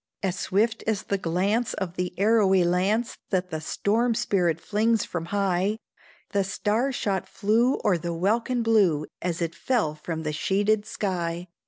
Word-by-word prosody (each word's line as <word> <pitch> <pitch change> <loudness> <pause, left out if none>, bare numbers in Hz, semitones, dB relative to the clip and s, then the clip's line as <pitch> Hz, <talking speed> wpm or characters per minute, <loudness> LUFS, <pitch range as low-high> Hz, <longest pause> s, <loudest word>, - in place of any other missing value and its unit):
As 185 -2 0
swift 215 +4 0
as 220 -3 0
the 200 - -2
glance 195 +8 0
of 185 -3 -3
the 180 -1 -2
arrowy 200 -2 +4
lance 190 +7 0
That 185 -2 -1
the 160 -1 -3
storm 225 +8 0
spirit 185 -8 +1
flings 215 +3 +1
from 170 -2 -4
high, 195 +1 0 0.5
The 200 -1 +2
star 215 +7 0
shot 200 -7 -2
flew 230 +5 +2
o'er 180 -4 +3
the 170 +2 -3
welkin 225 +8 0
blue, 195 -10 +3 0.2
As 175 -1 -1
it 165 0 -3
fell 215 -6 0
from 160 +1 -5
the 155 -1 -2
sheeted 205 +6 +1
sky. 175 -4 -3
195 Hz, 160 wpm, -26 LUFS, 175-220 Hz, 0.5 s, arrowy